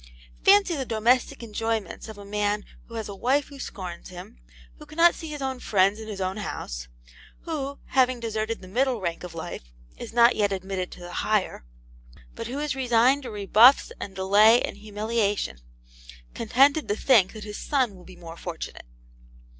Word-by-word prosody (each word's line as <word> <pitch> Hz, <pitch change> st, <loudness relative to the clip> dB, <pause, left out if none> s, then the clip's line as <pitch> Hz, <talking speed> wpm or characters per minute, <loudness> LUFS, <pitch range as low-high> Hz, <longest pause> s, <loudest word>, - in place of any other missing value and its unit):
Fancy 395 Hz, -3 st, +5 dB
the 275 Hz, -, -2 dB
domestic 235 Hz, +1 st, +1 dB
enjoyments 225 Hz, -1 st, -3 dB
of 215 Hz, -, -9 dB
a 205 Hz, -, -10 dB
man 205 Hz, 0 st, -1 dB, 0.2 s
who 230 Hz, -, -11 dB
has 220 Hz, -2 st, -4 dB
a 200 Hz, -, -6 dB
wife 265 Hz, +9 st, 0 dB
who 280 Hz, -1 st, -12 dB
scorns 180 Hz, -8 st, -7 dB
him; 175 Hz, -, -11 dB, 0.4 s
who 300 Hz, -, -12 dB
cannot 335 Hz, +3 st, +4 dB
see 325 Hz, -, -8 dB
his 295 Hz, -2 st, -6 dB
own 265 Hz, -1 st, -3 dB
friends 200 Hz, 0 st, +2 dB
in 220 Hz, -, -8 dB
his 205 Hz, -3 st, -6 dB
own 190 Hz, +1 st, -2 dB
house; -, -, -5 dB, 0.5 s
who 280 Hz, -4 st, -4 dB
having 255 Hz, -2 st, +2 dB
deserted 225 Hz, 0 st, -3 dB
the -, -, -10 dB
middle 250 Hz, +4 st, 0 dB
rank 170 Hz, -3 st, -3 dB
of 175 Hz, -2 st, -8 dB
life, -, -, -7 dB, 0.3 s
is -, -, -8 dB
not 235 Hz, +1 st, +5 dB
yet 205 Hz, -2 st, +1 dB
admitted 190 Hz, -1 st, -3 dB
to -, -, -13 dB
the 175 Hz, 0 st, -9 dB
higher; 210 Hz, -, -1 dB, 0.7 s
but -, -, -6 dB
who 255 Hz, +3 st, -5 dB
is 295 Hz, -2 st, -2 dB
resigned 255 Hz, +1 st, +3 dB
to 255 Hz, -, -7 dB
rebuffs 215 Hz, +5 st, +5 dB
and 195 Hz, -, -7 dB
delay 205 Hz, +5 st, +5 dB
and -, -, -4 dB
humiliation, 210 Hz, -, -2 dB, 0.7 s
contented 275 Hz, +7 st, +3 dB
to 205 Hz, -, 0 dB
think 220 Hz, -5 st, +4 dB
that 215 Hz, -2 st, -8 dB
his 210 Hz, 0 st, -7 dB
son 260 Hz, -7 st, 0 dB
will 180 Hz, -2 st, -14 dB
be 185 Hz, 0 st, -13 dB
more 170 Hz, -1 st, -10 dB
fortunate. 170 Hz, -, -7 dB
215 Hz, 180 wpm, -25 LUFS, 195-255 Hz, 0.7 s, Fancy